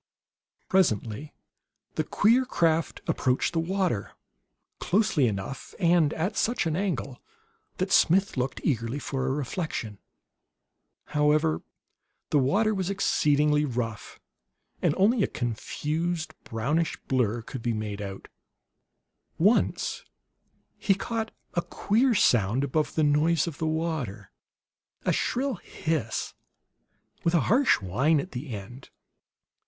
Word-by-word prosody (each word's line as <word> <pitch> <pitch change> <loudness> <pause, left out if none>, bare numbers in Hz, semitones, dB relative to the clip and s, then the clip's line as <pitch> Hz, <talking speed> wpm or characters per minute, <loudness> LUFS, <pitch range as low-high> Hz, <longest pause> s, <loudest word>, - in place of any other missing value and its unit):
Presently 140 - +1 0.6
the 155 - 0
queer 230 - +3
craft 165 -10 0
approached 130 +4 +1
the 165 - +1
water 180 - -1 0.7
closely 190 - +2
enough, 105 +5 -5
and 170 -4 +4
at 180 +7 -1
such 235 -3 +1
an 160 -1 0
angle, 155 -9 -2 0.6
that 185 +1 -1
Smith 190 +4 +4
looked 130 0 -2
eagerly 115 -2 0
for 135 -2 -3
a - - +1
reflection. 135 - -3 1.1
However, 150 +1 +2 0.7
the 145 - +4
water 205 +12 +2
was 190 -2 -2
exceedingly 150 -6 +2
rough, 120 -5 -4 0.6
and - - +2
only 210 +5 +4
a - - +3
confused 155 +8 -3
brownish 150 +9 -1
blur 120 -3 +1
could 130 +1 -7
be 120 - 0
made 105 -1 -4
out. 100 -1 -7 1.1
Once 205 +8 +2 0.8
he 195 - +3
caught 225 +2 -3 0.2
a 170 - +1
queer 230 +8 +1
sound 120 - +3
above 150 +3 -1
the 155 - +2
noise 150 +2 +3
of 165 -5 -6
the 160 - 0
water; 155 - -3 0.7
a - - +3
shrill 260 -2 0
hiss, 155 -9 -3 0.9
with 170 +1 +2
a 165 - +4
harsh 255 - +4
whine 135 - +2
at 185 - -5
the 135 +3 -6
end. 115 +5 -8
155 Hz, 120 wpm, -27 LUFS, 125-180 Hz, 1.1 s, and